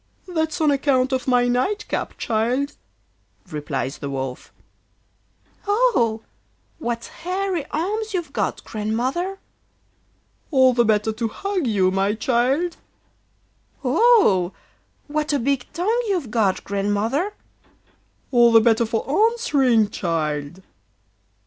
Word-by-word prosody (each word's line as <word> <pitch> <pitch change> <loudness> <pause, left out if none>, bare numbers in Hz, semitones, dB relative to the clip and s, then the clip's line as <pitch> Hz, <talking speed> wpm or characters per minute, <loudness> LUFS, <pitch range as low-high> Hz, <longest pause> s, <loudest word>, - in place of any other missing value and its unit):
'That's 320 -3 -2
on 310 -2 +3
account 270 -2 +1
of 260 0 -2
my 245 -1 +3
night 260 +13 0
cap, - - -3
child,' 245 +6 -1 0.8
replies 145 -2 -3
the 140 - -5
Wolf. 130 -2 -5 1.2
'Oh! 405 - +2 0.6
what 235 -4 -3 0.2
hairy 365 -2 -2
arms 425 +8 -2
you've 350 -4 -3
got, - - -2
Grandmother!' 255 - -2 1.1
'All 260 -4 +5
the 240 -1 +3
better 215 0 +2
to 225 +1 -2
hug 375 - -2
you, 190 -4 +2
my 195 +2 +1
child.' 260 +9 0 1.1
'Oh! 385 - +4 0.5
what 300 0 -2
a - - +3
big 270 0 -1
tongue 440 +8 0
you've 350 - -1
got, 210 -5 +1
Grandmother!' 205 - -1 1.0
'All 240 -2 +5
the 225 - +8
better 225 0 +3
for 225 0 -2 0.2
answering, 270 - +2
child. 160 0 -3
245 Hz, 110 wpm, -22 LUFS, 215-330 Hz, 1.2 s, the